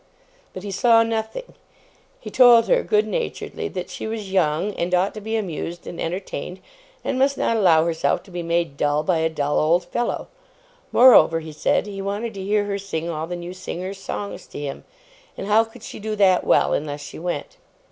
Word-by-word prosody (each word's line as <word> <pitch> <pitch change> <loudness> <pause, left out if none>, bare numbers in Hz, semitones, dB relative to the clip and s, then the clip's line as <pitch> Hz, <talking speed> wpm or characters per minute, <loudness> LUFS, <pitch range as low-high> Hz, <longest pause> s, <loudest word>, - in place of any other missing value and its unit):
But 185 - -8
he 205 - -5
saw 230 +4 +4
nothing. 225 - -4 0.7
He - - -9
told 245 -3 +7
her, - - +3
good 425 -2 +2
naturedly, - - -4
that - - -6
she - - -5
was 215 -3 -5
young 180 +2 +1
and 180 0 0
ought 185 +2 +1
to 215 - -8
be 220 +2 -3
amused 175 -4 -4
and 170 - -7
entertained, 180 0 -4 0.4
and 260 - -1
must 275 +1 +2
not 230 - +1
allow 170 -7 +4
herself 165 -1 0
to 190 - -17
be 175 0 -4
made 170 -3 -1
dull 145 +1 +1
by 165 0 +1
a 160 0 +1
dull 145 -2 0
old 170 +3 +2
fellow. 240 +7 -2 0.6
Moreover, 165 -10 +7
he 160 -1 -8
said, 150 - +1
he 200 -1 -6
wanted 205 +4 -3
to 195 - -7
hear 205 +1 +1
her 200 0 -2
sing 170 -4 -4
all 160 0 -4
the 175 - -4
new 175 +1 -7
singer's 185 +1 -6
songs 200 +1 -6
to - - -8
him; 145 -2 -6 0.5
and - - -5
how 210 +2 +4
could 225 0 -14
she - - -8
do 215 +1 -3
that 190 -3 +4
well, - - +3
unless 145 -1 -3
she 145 - -9
went? 170 -4 -4
190 Hz, 200 wpm, -22 LUFS, 165-220 Hz, 0.7 s, told